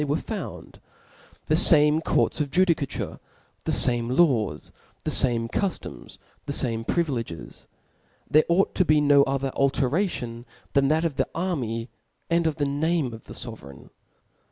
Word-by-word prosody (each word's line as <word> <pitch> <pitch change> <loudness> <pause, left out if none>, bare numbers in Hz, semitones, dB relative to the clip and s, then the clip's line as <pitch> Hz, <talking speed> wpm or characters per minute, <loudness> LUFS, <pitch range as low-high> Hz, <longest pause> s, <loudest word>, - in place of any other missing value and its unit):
they - - 0
were 145 +2 0
found - - -7 0.3
} - - -28
the 155 - +2
fame 155 -2 +6
court? - - +1
qf 150 - -2
ji^Jicatu^tf, 165 -3 0 0.5
the - - 0
fame 120 -1 +2
lawsi 125 - +1 0.3
the - - -1
fame 115 -2 +2
cuftoms, 190 - -4 0.3
the - - -2
fame 115 -5 -1
privi 170 +6 0
leges: 85 -6 -11 0.6
there 155 +1 +4
ought 180 +3 +2
to 185 - +2
be 155 -3 +3
n^ 145 -1 +5
o^^er 135 0 -2
alteration 135 - -1 0.3
thaa 140 -1 +3
that 160 +2 +1
of 155 -5 -2
the - - 0
army 125 -11 -2 0.4
and 170 -1 +2
pf 155 - -1
the 145 - -1
n^me 145 -1 -1
of 115 - -11
the - - -9
fovereign. 70 - -9
140 Hz, 155 wpm, -25 LUFS, 120-160 Hz, 0.6 s, fame